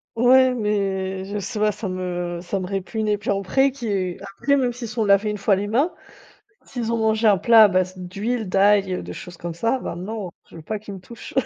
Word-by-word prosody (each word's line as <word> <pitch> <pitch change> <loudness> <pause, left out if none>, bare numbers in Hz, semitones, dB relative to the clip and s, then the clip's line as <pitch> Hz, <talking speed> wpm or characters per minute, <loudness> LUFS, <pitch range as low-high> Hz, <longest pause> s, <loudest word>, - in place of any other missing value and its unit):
Ouais, 255 +2 +5
mais 195 -4 -1
je 205 +1 -4
sais 200 +2 -5
pas, 210 0 +3
ça 205 -1 -5
me 175 -1 -3
ça 185 +2 -3
me 180 - -4
répugne 200 +3 -3
et 210 -1 +2
puis 205 - -2
après 230 +8 +2
qu'ils 200 -9 -3
après 200 +8 0
même 255 -2 +1
s'ils 240 -1 -7
sont 220 0 -1
lavés 200 +1 +3
une 210 - -5
fois 200 0 +3
les 200 +2 -2
mains, 270 +11 +1 0.8
s'ils 235 -3 -3
ont 230 - 0
mangé 220 0 +2
un 205 -3 +5
plat 225 +3 +7
à - - +6
base 185 -1 0
d'huile, 200 +4 -3
d'ail, 195 0 +3
heu, 180 - -3
de - - -7
choses 175 -2 -10
comme 170 -1 -5
ça, 230 +9 0
bah 245 - -5
non, 190 0 -5 0.2
je - - -13
veux 165 - -10
pas 215 +7 -4
qu'ils 205 -1 -9
me 190 - -9
touchent. 230 +6 -11
205 Hz, 235 wpm, -22 LUFS, 190-225 Hz, 0.8 s, plat